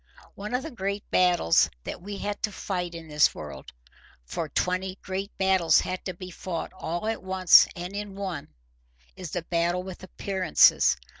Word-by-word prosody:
One 210 +4 -4
of 255 - -1
the 320 - -6
great 200 -3 -4
battles 175 - +4
that - - -6
we 200 +2 -6
have 205 +1 -4
to 210 - -1
fight 180 -3 -4
in 165 -1 -8
this 150 -1 +3
world—for 65 - -9
twenty 185 +4 -1
great 195 +1 -4
battles 190 -3 +4
have 185 0 -4
to 185 - -4
be 185 0 -9
fought 170 -1 -5
all 175 +1 -4
at 225 0 -2
once 185 -1 +6
and 180 +2 -6
in 205 -1 -5
one—is - - -9
the 175 +1 -3
battle 170 +1 0
with 185 -1 -9
appearances. 190 -1 +3
185 Hz, 160 wpm, -27 LUFS, 165-195 Hz, -, once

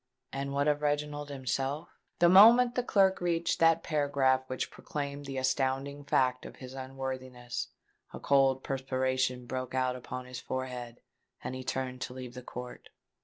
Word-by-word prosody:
And 140 0 -3
what 140 +1 +1
of 150 0 +2
Reginald 145 0 -1
himself? 135 +2 -2 0.3
The 175 - +5
moment 230 +7 +8
the 250 - +1
clerk 195 -6 +3
reached 170 -1 0
that 165 0 +4
paragraph 140 -4 +2
which 130 -1 -3
proclaimed 145 -1 -5
the 135 -1 -4
astounding 135 +2 -1
fact 130 -2 +2
of - - -9
his 130 -1 -10
unworthiness, 130 -2 -5 0.4
a - - -8
cold 135 -1 +3
perspiration 130 -1 -1
broke 130 +1 -4
out 130 -1 +1
upon 125 0 -6
his 125 0 -7
forehead; 125 -2 -5 0.4
and - - -4
he 130 0 -5
turned 130 0 -3
to 125 - -4
leave 125 -2 -7
the 125 - -8
court. 125 0 -9
135 Hz, 160 wpm, -30 LUFS, 130-145 Hz, 0.4 s, moment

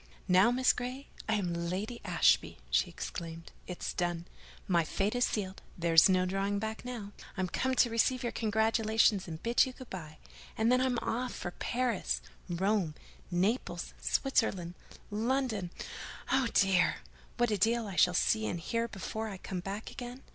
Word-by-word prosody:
"Now, 185 +4 +6
Miss 255 +1 +4
Grey, 255 +3 -5 0.2
I'm 200 -6 +1
Lady 185 +8 -3
Ashby!" 180 - +3
she 60 - +3
exclaimed. 165 0 -6 0.2
"It's 180 - -4
done, 175 -1 -1 0.4
my 175 -4 +3
fate 195 +6 -1
is 245 0 +3
sealed: 195 -3 -3 0.2
there's 165 0 +6
no 185 -1 +3
drawing 195 +2 0
back 220 +1 -4
now. 235 -5 -6 0.3
I'm 185 -1 0
come 260 +8 0
to 240 - +4
receive 255 +3 +2
your 240 - -1
congratulations 220 -2 +2
and 160 -1 -7
bid 235 +1 +4
you 255 - -6
good 255 -1 -12
by; 155 -4 -7 0.4
and 225 +2 +3
then 255 0 +4
I'm 255 -2 +1
off 250 +2 -2
for 175 - -4
Paris, 240 +1 -1 0.3
Rome, 185 -2 +1 0.3
Naples, 190 +8 -1
Switzerland, 195 -10 +1 0.4
London—oh, 235 +2 -2
dear! 190 -2 +4 0.4
what 240 -2 +2
a 210 - +2
deal 230 +3 +2
I 195 -3 -6
shall 180 0 +5
see 220 +4 +2
and 175 - -2
hear 230 +7 -1
before 220 +1 -4
I 195 - -6
come 185 0 -5
back 195 +4 -5
again. 250 0 -8
210 Hz, 160 wpm, -32 LUFS, 180-240 Hz, 0.4 s, Now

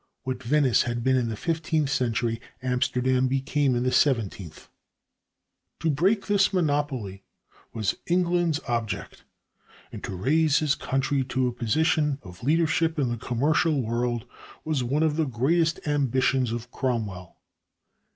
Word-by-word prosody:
What 130 0 -4
Venice 130 -1 +3
had 120 -1 -2
been 130 +1 +3
in 120 -3 +1
the 110 - -3
fifteenth 160 0 -1
century, 115 -2 0 0.2
Amsterdam 130 0 +1
became 135 0 +1
in 120 - 0
the 130 - +1
seventeenth. 105 - 0 1.1
"To 160 - +2
break 190 +8 +1
this 200 -1 +3
monopoly 145 - -1 0.5
was 110 -3 -1
England's 175 -3 +1
object; 115 -3 -3 0.7
and - - -9
to 95 - -5
raise 145 - +2
his 150 -3 +2
country 135 +1 -1
to 130 0 0
a - - -1
position 150 +4 +1
of 90 +1 -12
leadership 160 +3 +1
in 135 -4 +1
the 120 - -1
commercial 145 +7 +1
world 120 0 -1 0.4
was 155 -5 0
one 140 +6 0
of 155 -1 +1
the 160 - +2
greatest 155 +7 +1
ambitions 130 -3 +1
of 120 +1 -5
Cromwell." 105 -9 -3
130 Hz, 140 wpm, -26 LUFS, 120-155 Hz, 1.1 s, Venice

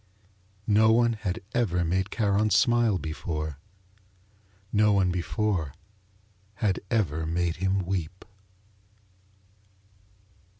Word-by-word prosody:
No 110 +1 +4
one 120 +1 +3
had 105 -5 -4
ever 90 -8 +1
made 95 +4 0
Charon 105 -1 +1
smile 115 0 +3
before, 80 -3 -4 1.1
no 105 0 +4
one 95 -2 +2
before 90 -3 -2 0.8
had 100 -2 0
ever 80 -8 0
made 85 0 -1
him 95 +1 0
weep. 90 -1 -4
95 Hz, 90 wpm, -27 LUFS, 85-105 Hz, 1.1 s, No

